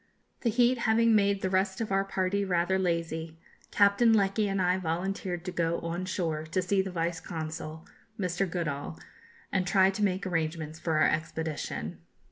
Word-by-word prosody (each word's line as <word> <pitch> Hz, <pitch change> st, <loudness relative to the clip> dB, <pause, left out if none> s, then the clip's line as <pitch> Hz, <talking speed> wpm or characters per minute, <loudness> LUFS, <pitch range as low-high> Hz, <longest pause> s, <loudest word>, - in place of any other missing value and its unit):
The 235 Hz, -, +1 dB
heat 240 Hz, +2 st, +3 dB
having 230 Hz, 0 st, +3 dB
made 200 Hz, -2 st, +3 dB
the 190 Hz, -, +1 dB
rest 190 Hz, 0 st, +1 dB
of 225 Hz, -3 st, -3 dB
our 195 Hz, 0 st, +3 dB
party 195 Hz, +1 st, 0 dB
rather 185 Hz, 0 st, +1 dB
lazy, 165 Hz, -2 st, -2 dB, 0.3 s
Captain 205 Hz, +3 st, +4 dB
Lecky 205 Hz, 0 st, +2 dB
and 195 Hz, 0 st, -1 dB
I 180 Hz, 0 st, +2 dB
volunteered 175 Hz, +1 st, -3 dB
to 180 Hz, -, -3 dB
go 170 Hz, -1 st, 0 dB
on 170 Hz, +2 st, -3 dB
shore 165 Hz, -4 st, -2 dB
to 170 Hz, +4 st, 0 dB
see 190 Hz, +2 st, +2 dB
the 190 Hz, -, -4 dB
Vice 170 Hz, -1 st, -2 dB
Consul, 160 Hz, -1 st, -6 dB, 0.3 s
Mr. 185 Hz, 0 st, 0 dB
Goodall, 145 Hz, -, -3 dB, 0.5 s
and 185 Hz, -1 st, 0 dB
try 190 Hz, 0 st, +4 dB
to 210 Hz, +2 st, -2 dB
make 190 Hz, -1 st, 0 dB
arrangements 160 Hz, -2 st, -2 dB
for 160 Hz, -2 st, 0 dB
our 155 Hz, -, +5 dB
expedition. 160 Hz, -1 st, -3 dB
185 Hz, 170 wpm, -29 LUFS, 165-195 Hz, 0.5 s, our